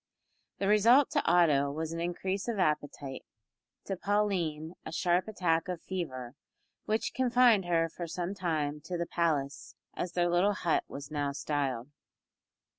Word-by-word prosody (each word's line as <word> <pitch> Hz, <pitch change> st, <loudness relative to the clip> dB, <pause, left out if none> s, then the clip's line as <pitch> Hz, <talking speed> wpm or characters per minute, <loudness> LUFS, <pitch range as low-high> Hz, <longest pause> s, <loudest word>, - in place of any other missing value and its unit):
The 195 Hz, -, -1 dB
result 230 Hz, +7 st, +5 dB
to -, -, +1 dB
Otto 150 Hz, -5 st, +4 dB
was 160 Hz, +2 st, -4 dB
an 165 Hz, -, -4 dB
increase 185 Hz, +4 st, -2 dB
of 235 Hz, -3 st, -1 dB
appetite; 145 Hz, -5 st, -1 dB, 0.6 s
to 195 Hz, -, -2 dB
Pauline, 180 Hz, -6 st, -1 dB
a -, -, -7 dB
sharp 175 Hz, +3 st, +1 dB
attack 175 Hz, -6 st, 0 dB
of 180 Hz, -2 st, -3 dB
fever, 130 Hz, -10 st, -5 dB, 0.5 s
which 220 Hz, +1 st, -1 dB
confined 245 Hz, -5 st, +4 dB
her 165 Hz, -1 st, +2 dB
for 170 Hz, +1 st, -7 dB
some 175 Hz, +3 st, -3 dB
time 155 Hz, -6 st, -2 dB
to 180 Hz, -, -3 dB
the 170 Hz, -, -1 dB
palace, 150 Hz, -5 st, -1 dB, 0.2 s
as 175 Hz, -1 st, -4 dB
their 175 Hz, -1 st, +2 dB
little 175 Hz, +4 st, +3 dB
hut 175 Hz, -4 st, 0 dB
was 140 Hz, +1 st, -8 dB
now 145 Hz, -2 st, -1 dB
styled. 140 Hz, -3 st, -2 dB
170 Hz, 150 wpm, -30 LUFS, 150-190 Hz, 0.6 s, result